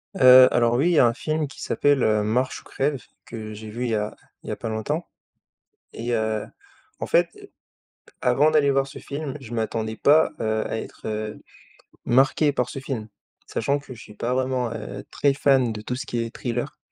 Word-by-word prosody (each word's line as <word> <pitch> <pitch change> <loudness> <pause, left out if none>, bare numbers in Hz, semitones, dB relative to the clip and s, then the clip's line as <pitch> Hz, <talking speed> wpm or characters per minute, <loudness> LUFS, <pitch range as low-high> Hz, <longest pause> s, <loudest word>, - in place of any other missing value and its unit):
Heu, 130 -4 +9
alors, 120 0 +3
oui, 145 +8 +3
il - - +2
y 160 - +5
a 120 - +7
un 115 - +1
film 155 +3 -1
qui 150 - -12
s'appelle, 145 -3 +2
heu, 105 -1 +3
Marche 125 +5 0
ou - - -25
crève, 135 -1 -1 0.2
que 110 -1 -7
j'ai 110 0 -9
vu 120 +3 -3
il - - -1
y - - +2
a 105 0 -2 0.3
il - - -8
y - - -2
a - - -2
pas 115 - -5
longtemps 145 +10 -2 0.9
et 120 +1 -3
heu, 110 -1 0 0.5
en - - -2
fait, - - +3 0.9
avant 135 +5 +3
d'aller 150 -2 +3
voir 135 0 +2
ce 140 - -10
film 140 -1 -5
je 120 -3 -10
m'attendais 110 -1 -2
pas, 150 +6 +4
heu, 110 -1 0
à - - -2
être, - - -9
heu, 110 0 -4 0.7
marqué 135 +4 +3
par 125 -2 -1
ce - - -7
film, 130 -5 -5 0.4
sachant 140 +5 0
que 140 -2 -11
je - - -13
suis 105 - -13
pas 120 +4 -2
vraiment, 130 -2 0
heu, 105 -2 -6
très 140 -1 +2
fan 135 -3 +3
de 105 - -6
tout 125 +3 -4
ce 130 - -5
qui 120 - -3
est 115 -1 -3
thriller 120 -1 -3
125 Hz, 215 wpm, -24 LUFS, 110-140 Hz, 0.9 s, Heu